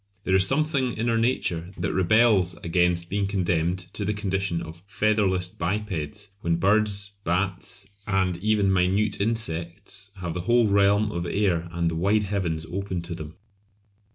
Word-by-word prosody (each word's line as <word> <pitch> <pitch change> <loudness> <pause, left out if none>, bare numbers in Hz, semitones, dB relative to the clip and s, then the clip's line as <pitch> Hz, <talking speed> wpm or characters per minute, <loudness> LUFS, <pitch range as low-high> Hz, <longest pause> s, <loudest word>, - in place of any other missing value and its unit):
There 95 - 0
is 95 0 +5
something 140 -3 0
in 115 +2 0
our 115 - +2
nature 90 -8 0
that 85 0 -2
rebels 95 -1 +4
against 85 0 +1
being 100 +1 -1
condemned 90 -2 0
to 105 - -3
the 105 +1 -1
condition 95 -4 -1
of 85 0 -9
"featherless 105 -4 +1
bipeds" 95 0 -3
when 85 0 +1
birds, 100 +2 +2
bats, 95 +2 -1 0.2
and 95 -3 +1
even 100 0 +2
minute 95 +3 +1
insects 100 -2 -2
have 90 -3 -4
the 90 - -3
whole 120 -1 +5
realm 100 +1 +3
of 85 -2 -3
air 90 -4 0
and 85 0 -1
the - - -3
wide 100 +6 +2
heavens 90 -6 -2
open 95 0 -4
to 85 0 -6
them. 80 -1 -8
95 Hz, 155 wpm, -25 LUFS, 85-105 Hz, 0.2 s, is